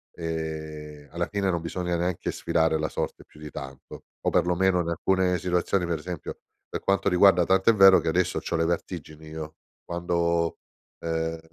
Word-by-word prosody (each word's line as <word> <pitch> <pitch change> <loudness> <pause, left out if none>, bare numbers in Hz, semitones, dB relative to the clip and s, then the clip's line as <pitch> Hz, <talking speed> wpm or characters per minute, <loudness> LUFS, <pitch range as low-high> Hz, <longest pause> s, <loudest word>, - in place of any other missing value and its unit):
ehm, 80 -3 -5
alla 85 +2 -2
fine, 100 -2 -1
non 85 - -1
bisogna 90 +1 -2
neanche 90 0 -1
sfidare 80 -1 +1
la 80 - -1
sorte - - -4
più 75 - -19
di 75 0 -8
tanto, 65 -1 -9 0.2
o - - +1
perlomeno 90 +1 +2
in 85 - -4
alcune 90 +2 +1
situazioni, 90 +1 0
per 85 -2 -2
esempio 90 -1 -6 0.3
per - - -4
quanto 100 0 +2
riguarda 90 -1 +6
tanto 95 +3 +3
è - - -1
vero 95 -2 +8
che - - -5
adesso 90 +2 +1
c'ho - - -3
le 80 - +2
vertigini 80 -2 -4
io 80 0 -7 0.3
quando, 85 -1 0 0.4
uhm, 80 0 -2
85 Hz, 170 wpm, -26 LUFS, 80-90 Hz, 0.4 s, vero